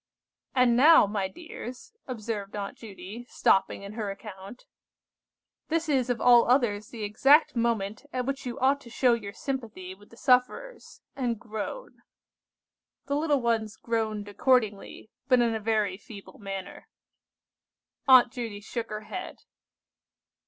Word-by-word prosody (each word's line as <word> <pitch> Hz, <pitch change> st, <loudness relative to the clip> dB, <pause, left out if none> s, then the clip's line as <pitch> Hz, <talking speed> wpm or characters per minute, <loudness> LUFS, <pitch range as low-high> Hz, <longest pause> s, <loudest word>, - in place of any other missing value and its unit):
"And 250 Hz, -2 st, +4 dB
now, 300 Hz, +1 st, +7 dB
my 200 Hz, -1 st, -2 dB
dears," 320 Hz, -, -10 dB
observed 215 Hz, -5 st, -5 dB
Aunt 200 Hz, -1 st, -5 dB
Judy, 205 Hz, +2 st, -10 dB
stopping 195 Hz, 0 st, +2 dB
in 200 Hz, +1 st, -8 dB
her 215 Hz, -2 st, -4 dB
account, 195 Hz, +2 st, -10 dB, 1.0 s
"this 330 Hz, 0 st, -1 dB
is 260 Hz, -4 st, +1 dB
of 245 Hz, -, 0 dB
all 240 Hz, -1 st, +6 dB
others 220 Hz, -5 st, +2 dB
the 225 Hz, -3 st, -7 dB
exact 270 Hz, +9 st, +4 dB
moment 230 Hz, +1 st, -1 dB
at 250 Hz, -1 st, -2 dB
which 275 Hz, +1 st, -3 dB
you 240 Hz, -, -5 dB
ought 275 Hz, +2 st, +2 dB
to 235 Hz, -, -13 dB
show 245 Hz, +1 st, +3 dB
your 210 Hz, -4 st, -3 dB
sympathy 220 Hz, -8 st, -5 dB
with 205 Hz, +2 st, -19 dB
the 230 Hz, -, -17 dB
sufferers, 260 Hz, -, 0 dB
and 240 Hz, -5 st, -2 dB
groan." 220 Hz, -, -7 dB, 1.0 s
The 280 Hz, +1 st, -1 dB
little 295 Hz, -2 st, +1 dB
ones 225 Hz, -2 st, 0 dB
groaned 220 Hz, -3 st, -2 dB
accordingly, 215 Hz, -1 st, 0 dB, 0.2 s
but 255 Hz, -2 st, +5 dB
in 235 Hz, -1 st, +2 dB
a 220 Hz, -, -2 dB
very 210 Hz, -3 st, 0 dB
feeble 205 Hz, -1 st, -13 dB
manner. 195 Hz, -2 st, -7 dB, 1.2 s
Aunt 255 Hz, -2 st, +7 dB
Judy 230 Hz, -5 st, -5 dB
shook 225 Hz, +3 st, -5 dB
her 215 Hz, 0 st, -5 dB
head. 365 Hz, +12 st, -7 dB
230 Hz, 140 wpm, -27 LUFS, 205-255 Hz, 1.2 s, now